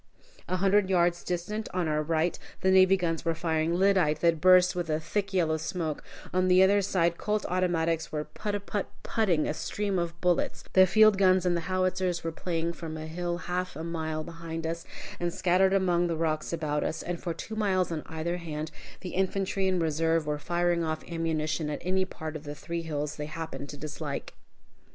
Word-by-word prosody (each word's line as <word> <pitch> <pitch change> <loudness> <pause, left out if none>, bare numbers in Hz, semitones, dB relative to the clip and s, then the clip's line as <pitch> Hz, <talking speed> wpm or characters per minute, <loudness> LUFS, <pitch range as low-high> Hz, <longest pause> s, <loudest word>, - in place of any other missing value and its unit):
A 185 - 0
hundred 195 +1 +3
yards 175 -2 +2
distant, 205 +5 -3
on 180 -3 +1
our 150 0 +1
right, 160 +2 0 0.2
the 190 - +3
navy 190 0 +6
guns 165 -3 -1
were 165 -1 0
firing 160 0 0
lyddite 180 -5 +3
that 170 -2 +3
burst 185 0 +6
with 175 -2 -2
a 155 0 +1
thick 195 +5 -2
yellow 165 -4 +2
smoke; 160 -1 -3 0.3
on 185 0 +2
the 185 +1 +6
other 200 +1 +4
side 170 -3 +1
Colt 210 0 -1
automatics 170 -3 0
were 150 -1 -2
put 205 +3 -4
put 205 -1 -2 0.2
put 220 -3 0
ing 160 -4 +2
a - - 0
stream 200 +3 -2
of 170 0 -3
bullets; 180 -1 0
the 185 0 +7
field 215 0 +5
guns 185 -1 +4
and 175 -1 +2
the 170 - 0
howitzers 185 -1 0
were 165 - -2
playing 170 0 -2
from 160 -2 -6
a 155 - -6
hill 175 +2 -3
half 180 -1 -2
a 160 - -5
mile 160 -2 -3
behind 165 0 -6
us, 165 +1 -3 0.3
and 175 0 -1
scattered 185 +2 +3
among 180 -3 +2
the 165 -1 -1
rocks 155 -1 -1
about 155 -3 -1
us, - - -3
and 175 -1 -4
for 175 - -2
two 220 - -6
miles 190 -5 +1
on 160 -2 -2
either 165 +2 -3
hand, 155 -2 -5 0.3
the 185 - -5
infantry 190 +1 0
in 185 -1 +2
reserve 165 0 +1
were 150 0 -2
firing 175 +1 +1
off 155 -1 -2
ammunition 160 -2 -1
at 150 - -2
any 185 +1 +1
part 160 -4 -7
of 155 - -6
the 145 -1 -6
three 170 +2 -4
hills 150 -2 -3
they 150 0 -4
happened 155 -2 -6
to 145 - -7
dislike! 150 -1 -5
170 Hz, 200 wpm, -28 LUFS, 160-185 Hz, 0.3 s, the